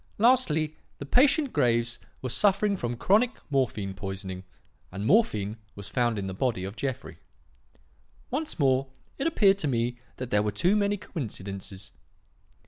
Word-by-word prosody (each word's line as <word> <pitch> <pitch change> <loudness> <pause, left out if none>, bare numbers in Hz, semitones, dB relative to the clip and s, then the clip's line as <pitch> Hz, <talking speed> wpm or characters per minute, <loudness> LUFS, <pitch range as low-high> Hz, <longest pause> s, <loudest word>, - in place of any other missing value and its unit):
Lastly, 165 -11 +3 0.2
the 140 - -7
patient 275 - +3
Graves 120 -4 +1 0.2
was 125 -1 0
suffering 200 +2 +3
from 120 -8 -3
chronic 220 - +3
morphine 115 -8 0
poisoning, 95 -1 -6 0.5
and 100 +3 -5
morphine 110 - +2 0.2
was 100 0 -8
found 120 -1 +1
in 100 - -3
the 95 - -4
body 105 -2 -1
of 95 +2 -5
Jeffrey. 130 +2 -4 1.1
"Once 300 +4 -2
more, 135 -2 +2 0.3
it 275 - +1
appeared 200 -11 +4
to 155 - 0
me 120 -1 -1 0.2
that 130 -1 -6
there 105 - +4
were 105 0 0
too 175 - +2
many 205 0 +1
coincidences. 100 - -6
125 Hz, 145 wpm, -27 LUFS, -, 1.1 s, appeared